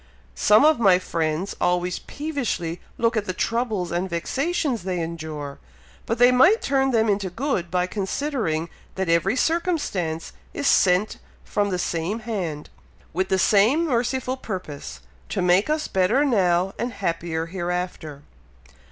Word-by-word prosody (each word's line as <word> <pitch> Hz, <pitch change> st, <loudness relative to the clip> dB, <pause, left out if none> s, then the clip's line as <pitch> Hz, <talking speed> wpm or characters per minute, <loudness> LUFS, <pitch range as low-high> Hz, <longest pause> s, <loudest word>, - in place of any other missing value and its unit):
Some 210 Hz, +7 st, +5 dB
of 310 Hz, -4 st, +4 dB
my 195 Hz, -5 st, +6 dB
friends 165 Hz, 0 st, -2 dB
always 180 Hz, 0 st, +1 dB
peevishly 260 Hz, -, -3 dB, 0.2 s
look 230 Hz, 0 st, +1 dB
at 215 Hz, -2 st, 0 dB
the 185 Hz, -, -3 dB
troubles 220 Hz, -7 st, -1 dB
and 175 Hz, +2 st, -1 dB
vexations 265 Hz, -, -1 dB
they 180 Hz, 0 st, -2 dB
endure, 160 Hz, -4 st, -5 dB, 0.5 s
but 230 Hz, -, 0 dB
they 245 Hz, +1 st, +6 dB
might 345 Hz, -, +5 dB
turn 270 Hz, -1 st, +2 dB
them 225 Hz, -3 st, +2 dB
into 200 Hz, -2 st, 0 dB
good, 190 Hz, -4 st, -2 dB
by 180 Hz, 0 st, +1 dB
considering 195 Hz, -, -2 dB, 0.3 s
that 190 Hz, -2 st, -2 dB
every 170 Hz, +6 st, +2 dB
circumstance 265 Hz, -, -1 dB, 0.2 s
is 285 Hz, -, -3 dB
sent 185 Hz, -3 st, +3 dB, 0.2 s
from 205 Hz, -1 st, -1 dB
the 185 Hz, -, -1 dB
same 175 Hz, +6 st, -2 dB
hand, 180 Hz, -10 st, -4 dB, 0.4 s
with 185 Hz, +3 st, -1 dB
the 190 Hz, -, +2 dB
same 220 Hz, -, +4 dB
merciful 255 Hz, -1 st, -1 dB
purpose 150 Hz, -, -7 dB, 0.3 s
to -, -, -2 dB
make 180 Hz, +6 st, +3 dB
us 305 Hz, 0 st, 0 dB
better 205 Hz, +10 st, +2 dB
now 185 Hz, -6 st, +2 dB
and 240 Hz, +1 st, -2 dB
happier 165 Hz, -3 st, -2 dB
hereafter." 175 Hz, -4 st, -4 dB
190 Hz, 145 wpm, -23 LUFS, 175-245 Hz, 0.5 s, my